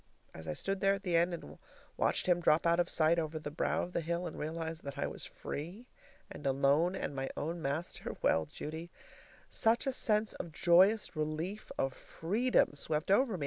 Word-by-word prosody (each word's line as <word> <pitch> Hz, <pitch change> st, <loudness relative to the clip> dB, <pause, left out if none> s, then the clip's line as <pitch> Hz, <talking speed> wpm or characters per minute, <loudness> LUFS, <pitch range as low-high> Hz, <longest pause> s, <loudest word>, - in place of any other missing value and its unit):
As 80 Hz, 0 st, -10 dB
I 80 Hz, -, -1 dB
stood 195 Hz, -, -2 dB
there 195 Hz, 0 st, +4 dB
at 195 Hz, -, -9 dB
the 180 Hz, -3 st, 0 dB
end 170 Hz, +2 st, +4 dB
and 75 Hz, -, -8 dB, 0.4 s
watched -, -, +1 dB
him 180 Hz, -1 st, +3 dB
drop 160 Hz, -1 st, +3 dB
out 170 Hz, +1 st, +4 dB
of 175 Hz, -, +2 dB
sight 165 Hz, +1 st, +3 dB
over 160 Hz, -1 st, -3 dB
the 150 Hz, -1 st, -5 dB
brow 155 Hz, -, 0 dB
of 180 Hz, -, -7 dB
the -, -, 0 dB
hill, 170 Hz, +2 st, -2 dB
and 170 Hz, -, -5 dB
realized 160 Hz, +1 st, -4 dB
that 140 Hz, 0 st, -6 dB
I -, -, 0 dB
was -, -, -5 dB
free 175 Hz, +11 st, -6 dB, 0.5 s
and -, -, -5 dB
alone 140 Hz, +7 st, +3 dB
and 145 Hz, -, -3 dB
my 135 Hz, 0 st, -2 dB
own 165 Hz, +3 st, -3 dB
master 155 Hz, +4 st, -3 dB
well, 80 Hz, -1 st, +3 dB
Judy, 160 Hz, -, -6 dB, 0.6 s
such 225 Hz, +4 st, +2 dB
a 270 Hz, -, 0 dB
sense 215 Hz, -3 st, +2 dB
of 165 Hz, -, -7 dB
joyous 190 Hz, +6 st, +4 dB
relief, 155 Hz, +7 st, -3 dB
of 135 Hz, -1 st, 0 dB
freedom, 215 Hz, +4 st, +1 dB
swept 150 Hz, +4 st, -2 dB
over 225 Hz, -1 st, +3 dB
me! -, -, -9 dB
170 Hz, 200 wpm, -33 LUFS, 150-190 Hz, 0.6 s, there